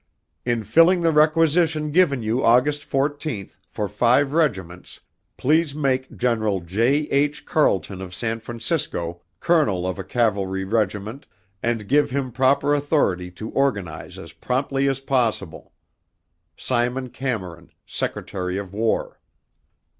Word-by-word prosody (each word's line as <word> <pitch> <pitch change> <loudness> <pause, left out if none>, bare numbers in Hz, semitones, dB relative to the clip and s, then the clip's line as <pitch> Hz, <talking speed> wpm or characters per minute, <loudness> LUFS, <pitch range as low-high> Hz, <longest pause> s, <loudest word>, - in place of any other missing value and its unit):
In 120 -2 0
filling 165 - +4
the 165 -1 +3
requisition 155 0 +3
given 145 -7 +3
you 115 +4 0
August 135 +5 +3
14th, 140 -6 -2
for 105 - -3
five 125 +7 +2
regiments, 95 - -2 0.4
please 155 +1 +2
make 130 -3 -1
General 110 -5 +1
J. 115 - +1
H. 145 +1 +1
Carleton 95 - +1
of 90 -1 -7
San 115 +3 -2
Francisco, 115 - -3 0.2
colonel 140 - +2
of 95 +1 -3
a - - -3
cavalry 95 -3 0
regiment, 105 +4 -2 0.3
and 115 -3 -1
give 145 +4 +3
him 130 -1 -2
proper 135 +3 +2
authority 140 - +1
to 110 +5 -8
organize 100 - -2
as - - -10
promptly 135 +2 -1
as 135 -1 -1
possible. 115 - -1 0.9
Simon 125 +1 -1
Cameron, 95 -10 -4 0.2
Secretary 90 0 -3
of 100 -1 -6
War. 110 +2 -1
125 Hz, 125 wpm, -22 LUFS, 100-145 Hz, 0.9 s, filling